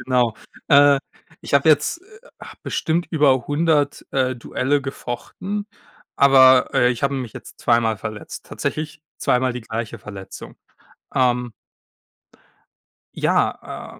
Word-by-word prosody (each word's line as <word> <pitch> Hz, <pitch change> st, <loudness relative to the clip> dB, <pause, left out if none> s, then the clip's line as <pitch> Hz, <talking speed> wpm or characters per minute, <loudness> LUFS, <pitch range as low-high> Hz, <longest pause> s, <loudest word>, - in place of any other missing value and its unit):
Genau. 125 Hz, -3 st, +1 dB, 0.3 s
Äh, 140 Hz, -1 st, +6 dB, 0.4 s
ich -, -, -4 dB
habe 140 Hz, +3 st, +4 dB
jetzt, 155 Hz, -, +3 dB
äh, 430 Hz, +3 st, -18 dB, 0.4 s
bestimmt 170 Hz, +2 st, -1 dB
über 140 Hz, -6 st, +3 dB
100, 145 Hz, -1 st, +1 dB
äh, 130 Hz, -1 st, 0 dB
Duelle 135 Hz, +4 st, -1 dB
gefochten. 185 Hz, +10 st, -5 dB, 0.5 s
Aber, 130 Hz, -2 st, +6 dB
äh, 125 Hz, 0 st, +4 dB
ich 120 Hz, -, -4 dB
habe 140 Hz, 0 st, +1 dB
mich 125 Hz, -5 st, -5 dB
jetzt -, -, -12 dB
zweimal 115 Hz, -2 st, +2 dB
verletzt. 105 Hz, +2 st, -8 dB
Tatsächlich 155 Hz, -1 st, -4 dB, 0.2 s
zweimal 125 Hz, 0 st, +1 dB
die 125 Hz, -, -6 dB
gleiche 115 Hz, 0 st, -5 dB
Verletzung. 100 Hz, -2 st, -10 dB, 0.6 s
Ähm 125 Hz, -2 st, +1 dB, 1.6 s
Ja, -, -, -2 dB
130 Hz, 115 wpm, -21 LUFS, 120-145 Hz, 1.6 s, Äh